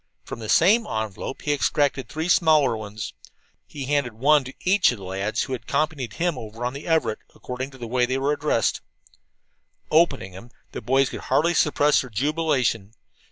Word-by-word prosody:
From - - -8
the 110 -2 -7
same 215 +6 +4
envelope 110 +3 -4
he 145 - +1
extracted 140 -1 0
three 160 +2 -3
smaller 155 -8 +4
ones. 105 -2 -7 0.5
He 140 -3 -7
handed 140 -3 0
one 145 +6 +3
to 130 - -8
each 185 -3 +3
of 125 - -6
the 100 - -11
lads 95 +3 -2
who 130 - -5
had 130 - -4
accompanied 150 -5 -2
him 170 -5 -1
over 115 +2 -7
on 125 - -2
the 140 +4 -8
Everett, 160 -9 +1 0.2
according 125 +2 -6
to 135 - -15
the 120 - -7
way 125 +1 +1
they 130 +1 -1
were 140 +2 +1
addressed. 145 -6 0 1.1
Opening 150 - +2
them, 95 +7 -12 0.2
the - - -6
boys 135 +4 +2
could - - -6
hardly 170 +3 +1
suppress 150 -2 +3
their 130 - -9
jubilation. 130 -4 0
135 Hz, 185 wpm, -24 LUFS, 115-150 Hz, 1.1 s, same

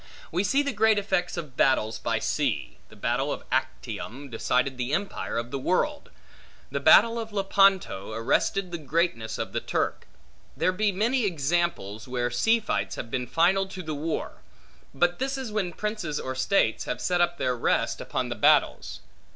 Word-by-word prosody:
We 180 +4 +1
see 275 +8 +2
the 280 -2 -2
great 220 0 +4
effects 190 -3 -1
of 150 -6 -6
battles 110 -5 +2
by - - 0
sea. - - -2
The - - -15
battle - - -1
of - - -4
Actium, 135 +5 -3
decided 125 +3 0
the 125 +2 -3
empire 195 -5 -2
of 120 +1 -3
the 140 - -3
world. 290 - 0 0.6
The - - -1
battle 230 0 +6
of 225 -1 -6
Lepanto, 195 - +2
arrested 175 - 0
the 170 - -4
greatness 155 -6 -1
of - - -4
the - - 0
Turk. - - -2 0.5
There 185 - +2
be 205 +3 +1
many 225 +5 +1
examples, 155 - -1
where 120 -1 -1
sea 225 - +3
fights 215 - -2
have 115 - -7
been 125 -1 -2
final 180 +8 +3
to 190 -1 -8
the 155 -1 -4
war; 155 +2 -4 0.5
but 175 +5 +1
this 270 +1 -1
is 260 -5 -5
when 205 -4 -1
princes 210 -7 -3
or 130 - -4
states 130 +10 +1
have - - -3
set 180 -1 +1
up 175 0 +1
their 130 -4 0
rest, 120 - 0
upon - - -2
the - - -3
battles. - - +2
175 Hz, 175 wpm, -26 LUFS, 130-200 Hz, 0.6 s, battle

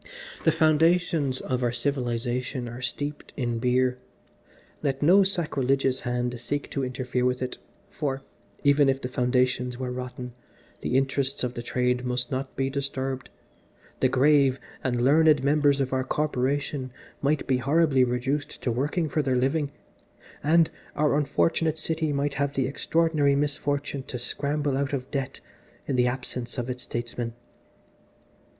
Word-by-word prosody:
The - - +6
foundations 160 -3 +3
of 130 -1 -2
our 120 -1 +1
civilisation 125 -1 -2
are 120 +2 -7
steeped 145 +4 -4
in 120 -4 -1
beer 125 +1 +2 0.8
let 135 0 -1
no 185 +6 +7
sacrilegious 135 -8 +1
hand 125 0 -2
seek 145 +4 -3
to 140 - -1
interfere 125 -1 -2
with 125 0 +1
it, 130 - -5 0.3
for, 135 -3 -3 0.4
even 140 0 +5
if 135 0 +1
the 125 - -4
foundations 125 0 +1
were 130 -1 -3
rotten, 125 -1 -6 0.5
the 125 - +1
interests 135 0 0
of 125 -1 -1
the 120 - -5
Trade 125 +1 0
must 125 -1 -2
not 130 +1 -3
be 135 - 0
disturbed, 135 -1 -3 0.7
the 130 - +3
grave 135 0 +4 0.2
and 120 -2 0
learned 150 +1 +5
members 145 0 +3
of 135 -1 -1
our 130 0 +1
Corporation 140 -1 -1 0.3
might 145 +1 +1
be 130 -2 +2
horribly 140 +1 +3
reduced 125 +4 -1
to 125 - +1
working 145 +7 0
for 155 +1 0
their 130 -3 0
living, 140 +4 +1 0.7
and 160 +2 +4 0.2
our 150 -1 +2
unfortunate 155 +2 +1
City 160 -1 -1
might 140 0 0
have 140 0 -1
the 135 - +1
extraordinary 150 0 +2
misfortune 145 0 -1
to 130 - -6
scramble 140 +3 -1
out 140 +1 -1
of 130 -1 -3
debt 135 -2 -3 0.5
in 135 - 0
the 125 0 +3
absence 125 0 -4
of 125 +1 -2
its 125 0 -6
statesmen." 120 0 -4
135 Hz, 150 wpm, -26 LUFS, 125-145 Hz, 0.8 s, no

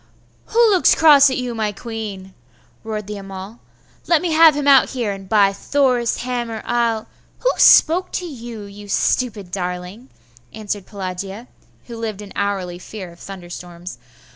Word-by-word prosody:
'Who 460 -1 +4
looks 375 -3 +4
cross 290 -3 +7
at 260 - -2
you, 250 -1 -3
my 215 -2 -1
queen?' 205 -3 -7 0.5
roared 215 -2 -5
the 210 +1 -6
Amal. 195 +3 -9 0.5
'Let 335 -1 +3
me 350 - -1
have 320 -1 +6
him 290 -1 -2
out 275 -2 +6
here, 240 -6 -2
and 195 -1 -8
by 200 -2 +4
Thor's 250 +2 +1
hammer, 240 -3 -4
I'll 230 -2 0 0.2
' - - -35
'Who - - +3
spoke 355 +3 +5
to 360 - -2
you, 240 -8 -8
you 205 0 -11
stupid 205 -2 -1
darling?' 180 +5 -5 0.4
answered 205 -2 -5
Pelagia, 195 +3 -6 0.4
who 235 - -9
lived 215 -3 -5
in 200 - -12
hourly 190 -3 -2
fear 185 -2 -9
of 170 - -18
thunderstorms. 175 -4 -9
215 Hz, 160 wpm, -20 LUFS, 195-250 Hz, 0.5 s, cross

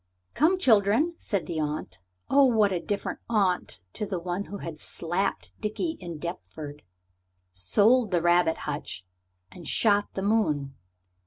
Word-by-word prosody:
"Come, 325 +7 +3
children," 230 - +4
said 200 -5 -2
the 165 -2 -3
aunt 150 -11 -3 0.3
oh, 280 0 +5
what 220 -5 +4
a 180 - 0
different 200 +3 -3
aunt 185 - +1
to - - -4
the 195 -3 -2
one 180 +3 -3
who 200 - -7
had 165 -5 -7
slapped 165 - -2
Dickie 320 +10 -2
in 170 -3 -6
Deptford, 150 -3 -7 0.7
sold 205 - +3
the 180 -2 +2
rabbit 175 -1 +3
hutch, 145 - -4 0.5
and 170 -4 -11
shot 205 -2 +3
the 190 - -3
moon! 155 -11 +1
185 Hz, 145 wpm, -27 LUFS, 155-215 Hz, 0.7 s, oh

